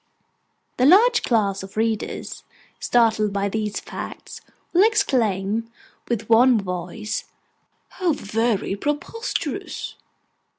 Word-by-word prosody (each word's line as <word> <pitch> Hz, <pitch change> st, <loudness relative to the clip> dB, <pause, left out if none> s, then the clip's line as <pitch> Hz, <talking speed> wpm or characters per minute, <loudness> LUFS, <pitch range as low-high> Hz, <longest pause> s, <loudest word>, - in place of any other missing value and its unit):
The 255 Hz, -, +4 dB
large 455 Hz, +8 st, +6 dB
class 205 Hz, -5 st, +1 dB
of 195 Hz, +2 st, -11 dB
readers, 220 Hz, -1 st, -2 dB, 0.4 s
startled 220 Hz, -3 st, +2 dB
by 200 Hz, 0 st, -1 dB
these 210 Hz, 0 st, -2 dB
facts, -, -, -8 dB, 0.3 s
will 360 Hz, +3 st, +6 dB
exclaim, 230 Hz, -, +1 dB, 0.4 s
with 230 Hz, -2 st, -2 dB
one 235 Hz, +1 st, +5 dB
voice, 180 Hz, +3 st, -4 dB, 0.6 s
'How 355 Hz, -4 st, 0 dB
very 215 Hz, -3 st, -1 dB
preposterous! 295 Hz, -, -4 dB
225 Hz, 95 wpm, -23 LUFS, 200-265 Hz, 0.6 s, large